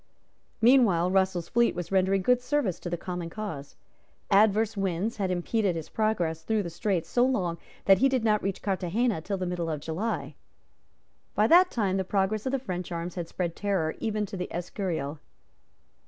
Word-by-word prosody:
Meanwhile 215 -9 +5
Russell's 190 -3 +1
fleet 235 0 +2
was 175 0 -5
rendering 190 0 +2
good 250 +2 +3
service 250 - 0
to 175 - -5
the 175 - -2
common 175 -1 -5
cause. 165 -8 -6 0.6
Adverse 215 +2 +4
winds 195 +3 -1
had 195 -3 -1
impeded 185 +2 0
his 160 -2 -6
progress 180 -8 0
through 215 +4 0
the 170 - -6
Straits 180 0 -1
so 245 - +2
long 185 -10 0 0.3
that 195 -1 +6
he 270 - +4
did 260 -3 0
not 215 -2 +2
reach 195 -1 -3
Carthagena 195 +1 0
till 195 +4 -3
the 185 - -3
middle 175 -2 -2
of 155 -2 -2
July. 165 +9 -3 1.0
By - - +4
that 360 +2 +6
time 195 -5 0
the 190 - 0
progress 200 +4 0
of - - 0
the 275 - +1
French 185 -9 -5
arms 170 +1 -4
had 175 -2 -4
spread 170 -1 -3
terror 190 -6 0
even 215 -1 -1
to 200 0 -8
the 180 -1 -3
Escurial. 170 -4 -3
190 Hz, 185 wpm, -27 LUFS, 175-220 Hz, 1.0 s, that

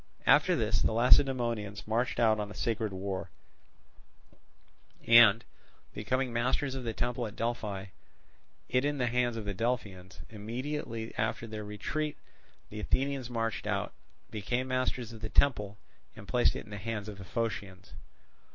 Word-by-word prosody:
After 150 +7 +5
this 110 -6 +1
the 110 - +2
Lacedaemonians 120 -4 +3
marched 115 +3 0
out 110 -2 +4
on 105 -1 -3
a 105 - -9
sacred 115 -3 -1
war, 95 0 -4 1.8
and, 115 -1 +8 0.5
becoming 130 +3 -1
masters 130 +3 0
of 130 -1 -4
the 115 - -2
temple 120 +1 -2
at 105 - -10
Delphi, 110 -4 -2 0.8
it 125 +1 +2
in 145 0 0
the 125 - +1
hands 120 -1 +1
of 110 - -5
the 100 - -2
Delphians. 100 -4 -3
Immediately 115 +1 -4
after 110 +1 -1
their 110 -1 -6
retreat, 125 +9 -3 0.5
the 105 - -6
Athenians 135 +3 0
marched 115 -2 -2
out, - - -1 0.4
became 120 +5 -2
masters 130 -2 -1
of 110 - -11
the 110 - -4
temple, 105 -7 +2 0.4
and - - -11
placed - - +3
it - - -6
in - - -14
the 105 - -5
hands 110 -2 -4
of 105 -2 -8
the - - -7
Phocians. 95 -3 -4
115 Hz, 150 wpm, -31 LUFS, 105-125 Hz, 1.8 s, and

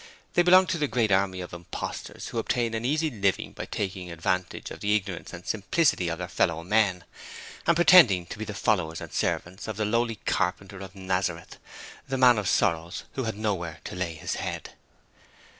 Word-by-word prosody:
They - - +5
belonged 185 +1 +6
to 170 -3 0
the 150 - +1
great 115 -3 +1
army 95 -1 +2
of 90 - -8
imposters 85 0 -6
who 115 - -2
obtain 115 0 0
an 110 0 -2
easy 155 +4 +1
living 100 -5 0
by - - -6
taking 95 -3 -4
advantage 85 +2 -2
of - - -8
the 105 +1 +2
ignorance 100 -4 -3
and 85 +1 -9
simplicity 105 - +1
of 85 0 -2
their 90 - -4
fellow 85 -2 0
men, 95 -2 +2 0.6
and 170 - +5
pretending 160 - +7
to 95 - -9
be 110 - -3
the 105 - -6
'followers' 90 -6 0
and - - -9
'servants' 95 +3 -2
of 110 -2 -4
the 110 - 0
lowly 115 +1 +1
Carpenter 95 +1 -1
of 95 0 -9
Nazareth 95 -1 -2 0.5
the 135 -1 -2
Man 125 -3 +6
of 100 - -1
Sorrows, 85 -1 0
who 130 - -2
had 110 -2 -3
not 105 -3 0
where 85 -2 -6
to - - -7
lay 90 -3 -3
His 75 - -4
head. - - -5
100 Hz, 195 wpm, -27 LUFS, 90-115 Hz, 0.6 s, pretending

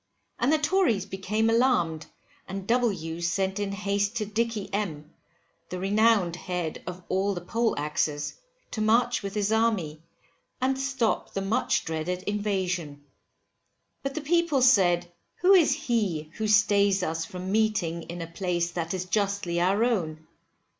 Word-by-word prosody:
And 255 - +2
the 315 - +4
Tories 295 - +2
became 205 +3 -1
alarmed, 225 -10 +2 0.4
and 195 0 -5
W 190 -9 0
sent 190 +3 0
in 200 -1 -2
haste 200 +1 -1
to 220 -2 -1
Dicky 220 0 -2
M, 160 -7 -3 0.6
the 180 - -4
renowned 200 -2 +3
head 180 -3 -4
of 180 0 -6
all 195 +1 0
the 175 - -4
poleaxes, 150 -8 -1 0.4
to 215 - -3
march 235 +3 +3
with 200 0 -5
his 210 0 0
army, 210 -9 +1 0.6
and 265 +1 0
stop 265 -4 -1
the 195 - 0
much 220 +6 0
dreaded 165 +3 -3
invasion. 185 -8 -2 1.0
But 275 0 -4
the 315 - -2
people 315 -3 +2
said, 175 -8 +4 0.2
who 370 +3 +4
is 350 -7 +6
he 215 - -1
who 220 - -1
stays 200 -2 +4
us 165 -1 -1
from 185 +2 -6
meeting 215 -6 +1
in 170 0 -5
a - - -4
place 175 0 -2
that 170 +1 -3
is 185 -1 -3
justly 195 -3 0
our 195 +5 +3
own? 160 -10 -1
200 Hz, 145 wpm, -27 LUFS, 175-225 Hz, 1.0 s, is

